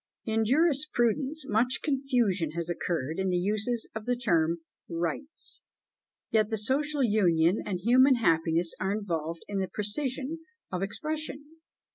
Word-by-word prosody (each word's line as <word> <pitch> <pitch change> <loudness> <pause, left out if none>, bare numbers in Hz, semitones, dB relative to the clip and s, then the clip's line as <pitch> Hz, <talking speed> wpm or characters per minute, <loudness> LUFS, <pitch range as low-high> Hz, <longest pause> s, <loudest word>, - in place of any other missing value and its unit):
In 225 0 +1
jurisprudence 280 0 +1
much 235 +4 +2
confusion 245 - +1
has 170 0 -2
occurred 165 -2 -2
in 190 0 +1
the 180 - +1
uses 215 +5 0
of 220 0 -6
the 245 - +2
term 170 -8 +1 0.3
rights; 170 - -4 0.7
yet 215 -1 +3
the 220 - -1
social 275 +6 +1
union 185 -5 +3
and 185 -4 -3
human 255 +5 +6
happiness 165 -5 +2
are 190 +2 0
involved 170 -6 -3
in 200 -1 -2
the 190 - -1
precision 260 +8 -2 0.3
of 180 - -2
the 195 - 0
expression. 300 +6 -5
215 Hz, 140 wpm, -29 LUFS, 175-265 Hz, 0.7 s, human